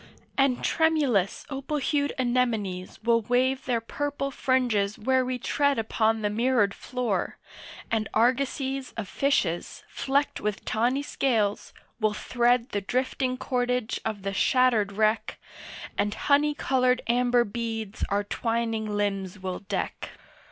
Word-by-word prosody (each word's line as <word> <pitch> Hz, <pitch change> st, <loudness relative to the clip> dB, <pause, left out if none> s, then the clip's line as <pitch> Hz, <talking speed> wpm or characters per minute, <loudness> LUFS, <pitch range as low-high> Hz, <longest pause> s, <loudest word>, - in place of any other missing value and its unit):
And 270 Hz, -2 st, +2 dB
tremulous 290 Hz, -, +2 dB
opal 275 Hz, +2 st, -3 dB
hued 285 Hz, 0 st, 0 dB
anemones 235 Hz, -7 st, -1 dB
Will 230 Hz, 0 st, +3 dB
wave 255 Hz, +4 st, +1 dB
their 245 Hz, -2 st, +1 dB
purple 280 Hz, +4 st, -3 dB
fringes 240 Hz, -7 st, +1 dB
where 260 Hz, +4 st, +2 dB
we 255 Hz, 0 st, -2 dB
tread 285 Hz, +3 st, +1 dB
Upon 220 Hz, 0 st, +1 dB
the 210 Hz, -, +2 dB
mirrored 230 Hz, -2 st, +2 dB
floor, 240 Hz, -8 st, -2 dB, 0.5 s
and 220 Hz, -1 st, 0 dB
argosies 265 Hz, +3 st, +1 dB
Of 220 Hz, -3 st, -3 dB
fishes 180 Hz, -10 st, 0 dB
flecked 280 Hz, +1 st, -1 dB
with 210 Hz, -1 st, -3 dB
tawny 245 Hz, +6 st, +1 dB
scales 220 Hz, -8 st, 0 dB, 0.3 s
will 215 Hz, -2 st, +1 dB
thread 240 Hz, +2 st, +1 dB
The 205 Hz, -, -2 dB
drifting 255 Hz, +3 st, -1 dB
cordage 250 Hz, -2 st, -1 dB
of 215 Hz, -3 st, -4 dB
the 195 Hz, 0 st, -2 dB
shattered 235 Hz, -1 st, +3 dB
wreck, 215 Hz, +2 st, +1 dB, 0.6 s
And 205 Hz, +1 st, +1 dB
honey 295 Hz, +1 st, +2 dB
coloured 255 Hz, -2 st, +2 dB
amber 245 Hz, 0 st, +3 dB
beads 225 Hz, -1 st, -4 dB
our 200 Hz, +1 st, +1 dB
twining 225 Hz, 0 st, -1 dB
limbs 200 Hz, -2 st, -2 dB
will 185 Hz, -1 st, -4 dB
deck. 200 Hz, -1 st, -4 dB
240 Hz, 130 wpm, -27 LUFS, 210-260 Hz, 0.6 s, Will